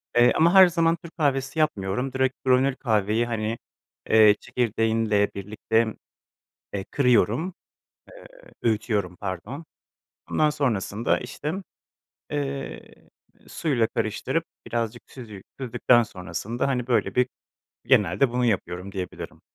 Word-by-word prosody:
eee, 120 +1 +6
ama 170 +3 +4
her 190 -1 +9
zaman 165 -1 +2
Türk 170 0 -12
kahvesi 140 -1 0
yapmıyorum, 125 -2 0
direkt 130 0 +1
granül 130 +1 +3
kahveyi 110 -1 +1
hani, 115 -1 -2 0.5
eee, 110 -1 +7
çekirdeğinle 115 -3 +1
birlikte, 110 +3 -1 0.8
eee, 100 -1 -3
kırıyorum, 125 - +2 0.6
eee, - - -14 0.4
öğütüyorum, 105 -5 0
pardon. 100 - -6 0.7
Ondan 155 - +3
sonrasında 115 -6 0
işte, 145 +5 -5 0.8
eee, 140 -2 -3 0.7
suyla 130 -8 0
karıştırıp 130 +11 -2 0.2
birazcık 120 0 -3
süzü 110 -7 -10 0.2
süzdükten 120 -1 +3
sonrasında 100 +5 -4
hani 125 -3 -1
böyle 110 -6 +1
bir 125 0 +3 0.6
genelde 105 +7 +3
bunu 125 0 +1
yapıyorum 95 -3 -2
diyebilirim. 95 -2 -7
120 Hz, 110 wpm, -25 LUFS, 105-135 Hz, 0.8 s, her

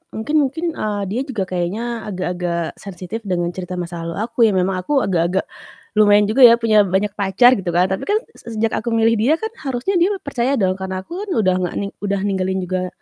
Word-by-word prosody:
mungkin 250 +8 -2
mungkin, 295 +4 -1
eee, 210 -9 -3
dia 240 +5 -1
juga 230 -8 -2
kayaknya 215 +7 -3
agak-agak 175 -3 -3
sensitif 185 +2 -7
dengan 175 -2 -1
cerita 180 0 -6
masa 170 -1 -5
lalu 170 - -5
aku 230 +1 -8
ya, 205 - +1
memang 185 0 +1
aku 285 -3 +2
agak-agak 180 0 +1 0.6
lumayan 205 0 +6
juga 250 +2 +8
ya, 235 - +7
punya 215 -3 +3
banyak 190 +3 0
pacar 205 +5 +3
gitu 175 -3 -3
kan. 180 +2 +3
Tapi 190 - -3
kan 425 +3 +1 0.2
se 230 - -9
sejak 220 +1 0
aku 235 - -3
milih 225 0 +3
dia 260 +9 +3
kan 440 +6 -5 0.2
harusnya 270 +9 0
dia 380 +4 +2
percaya 265 -1 0
dong, 190 -5 0
karena 190 0 -4
aku 375 - -7
kan - - -8
udah 185 -1 +3
nggak 180 -1 -3
ning 200 0 -3
udah 200 -1 -1
ninggalin 190 -1 -1
juga, 185 0 -2
205 Hz, 210 wpm, -19 LUFS, 185-235 Hz, 0.6 s, juga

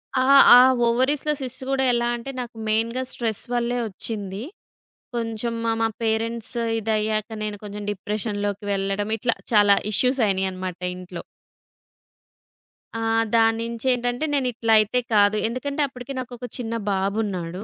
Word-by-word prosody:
ఆ! 255 - +3 0.3
ఆ! - - +10 0.3
ఓవరీస్‌లో 270 +5 +1
సిస్ట్ 260 +1 -4
గూడా 270 -1 +1
ఎలా 240 0 +1
అంటే, 240 +3 -6
నాకు 240 -2 -8
మెయిన్‌గా 230 +4 0
స్ట్రెస్ 225 -3 -2
వల్లే 240 0 0
ఒచ్చింది. 200 0 -5 0.7
కొంచెం 230 0 -2
మా 225 - +2
మా 225 - +3 0.2
పేరెంట్స్ 225 +1 -1 0.2
ఇదయ్యాక 215 0 -1
నేను 210 -1 -4
కొంచెం 205 0 -7
డిప్రెషన్ 205 +1 -3
లోకెళ్ళడం 200 0 -2
ఇట్లా 235 +1 0 0.2
చాలా 205 -2 +6 0.2
ఇష్యూస్ 255 +5 +2
అయినాయన్నమాట 185 -2 -2 0.2
ఇంట్లో. 180 -1 -8 1.7
ఆ! 225 - -3 0.3
దాన్నించేంటంటే 235 +4 +1
నేనిట్లయితే 230 -3 +2
కాదు. 205 0 +4
ఎందుకంటే 280 +5 -3
అప్పడికి 255 +1 -8
నాకొక్క 245 -1 -7
చిన్న 230 -1 -3 0.2
బాబున్నాడు. 195 -2 -2
225 Hz, 120 wpm, -23 LUFS, 205-245 Hz, 1.7 s, ఆ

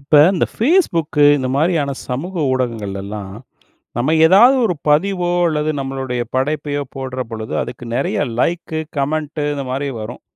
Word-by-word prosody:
இப்ப 140 +2 -2 0.2
இந்த 180 - +1
Facebook 230 - +2 0.2
இந்த 130 -2 -2
மாதிரியான 155 -2 +1 0.2
சமூக 150 +10 -4 0.2
ஊடகங்கள்லலாம் 105 -5 -4 0.6
நம்ப 125 +6 +1
ஏதாவது 215 +10 +7
ஒரு 190 - +1 0.2
பதிவோ 180 +3 +2 0.2
அல்லது 155 -1 -1
நம்மளுடைய 135 -2 -3
படைப்பையோ 145 +2 -1
போடுற 130 -1 -4
பொழுது, 110 -1 -6
அதற்கு 120 0 -7
நெறைய 135 - -1 0.2
லைக், 170 +3 -1 0.2
கமெண்ட் 150 +2 -2
இந்த 140 - -4
மாதிரி 140 +2 -2
வரும். 110 +3 -7
140 Hz, 135 wpm, -18 LUFS, 125-165 Hz, 0.6 s, ஏதாவது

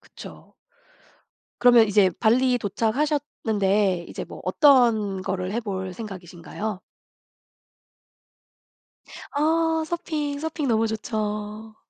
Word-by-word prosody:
그쵸. - - -13 1.0
그러면 240 -3 +6
이제 200 -2 +4
발리 250 +2 +3
도착하셨는데 210 - 0
이제 - - -6
뭐 - - -11
어떤 230 - +3
거를 185 0 -3
해볼 190 -5 -4
생각이신가요? 185 0 -7 2.5
아 320 +2 +1
서핑, 305 -4 -3
서핑 315 -2 -3
너무 225 -1 +2
좋죠. 215 0 -4
220 Hz, 195 characters per minute, -24 LUFS, 200-280 Hz, 2.5 s, 그러면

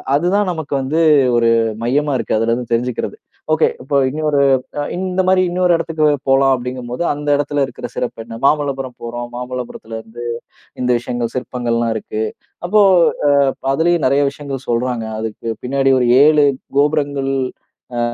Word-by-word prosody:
அது 160 +5 +1
தான் 205 -2 +2
நமக்கு 160 -4 -5
வந்து 150 +5 -1 0.4
ஒரு 115 -1 +3 0.3
மையமா 145 +4 +1
இருக்கு, - - -1
அதுலிருந்து 115 +2 -1
தெரிஞ்சுக்கிறது. 120 +1 -2 0.4
"ஓகே 155 - +3
இப்போ 140 +2 0
இன்னொரு 150 0 0 0.6
இந்த 185 0 -1
மாதிரி 185 0 +4
இன்னொரு 180 0 +2
இடத்துக்கு 160 -2 0 0.2
போலாம்." 135 0 +4
அப்படிங்கும்போது 125 +4 -4
அந்த 145 0 -7
இடத்தில 145 -1 0
இருக்கற 120 -1 -8
சிறப்பு 115 -2 -4
என்ன? 115 0 -8
மாமல்லபுரம் 135 -4 -1
போறோம், 120 +1 -5
மாமல்லபுரத்தில 125 -3 -6
இருந்து 120 +2 -9 0.6
இந்த 125 - 0
விஷயங்கள் 120 -1 -4
சிற்பங்கள்லாம் 120 -2 -1
இருக்கு. 110 0 -3 0.4
அப்போ 210 +3 +4 0.6
அ - - +5 0.3
அதுலயும் 170 +1 +2
நிறைய 140 +2 +3
விஷயங்கள் 140 -2 -7
சொல்றாங்க. 120 -1 -1
அதுக்கு 110 +1 -6 0.2
பின்னாடி 135 +1 +2
ஒரு 125 - +2 0.2
7 150 -1 +5 0.3
கோபுரங்கள் 140 -2 +1 0.6
அ - - 0
135 Hz, 140 wpm, -18 LUFS, 120-150 Hz, 0.6 s, அ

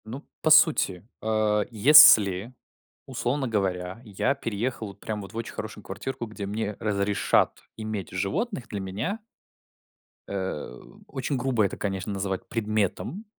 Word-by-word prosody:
Ну, 125 +6 -8 0.2
по 155 - +2
сути, 140 - +4
а, 110 -1 +1
если, 110 -4 +7 0.5
условно 130 +1 -2
говоря, 95 -2 -2
я 105 +4 0
переехал 115 -2 -3
вот 100 0 -12
прям 105 0 -4
вот 100 +2 -11
в - - -7
очень 115 - -5
хорошую - - -7
квартирку, 135 -3 -5
где 110 -2 -7
мне 105 +1 -3
разрешат 100 -1 +1 0.2
иметь 110 -3 -5
животных. 110 - -2
Для 105 - -4
меня 105 - -3 1.1
Э, 95 -10 -4 0.3
очень 135 +1 -3
грубо 125 -3 +1
это, 100 - -3
конечно, 95 0 -3
называть 95 -1 -3
предметом. 110 - -2
110 Hz, 135 wpm, -26 LUFS, 100-120 Hz, 1.1 s, если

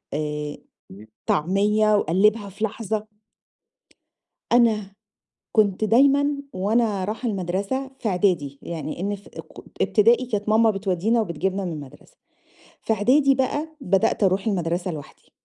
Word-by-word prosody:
آآ، 150 -1 -3 0.7
طعمية 210 +6 +2
وقلّبها 205 +4 +2
في 200 +3 -5
لحظة 215 0 -3 1.5
أنا 215 -5 +3 0.6
كنت 210 -2 +2
دايمًا 280 +5 +4 0.2
وأنا 205 0 0
راحة 225 +3 -3
المدرسة 200 +8 -3
في 220 - -1
إعدادي 175 -7 0
يعني 160 -1 -6
إن 205 +1 -1
في 200 - -16
أ - - -3
ك - - -12
إبتدائي 235 +4 +3
كانت 210 -3 -3
ماما 220 +1 +4
بتودّينا 195 +3 0
وبتجيبنا 190 +1 -2
من 170 - -3
المدرسة، 145 -3 -11 0.6
في 220 - 0
إعدادي 270 +6 +3
بقى 290 +4 -1
بدأت 195 +1 +1
أروح 195 +3 +1
المدرسة 175 -2 -1
لوحدي. 150 -3 -11
205 Hz, 125 wpm, -23 LUFS, 180-225 Hz, 1.5 s, دايمًا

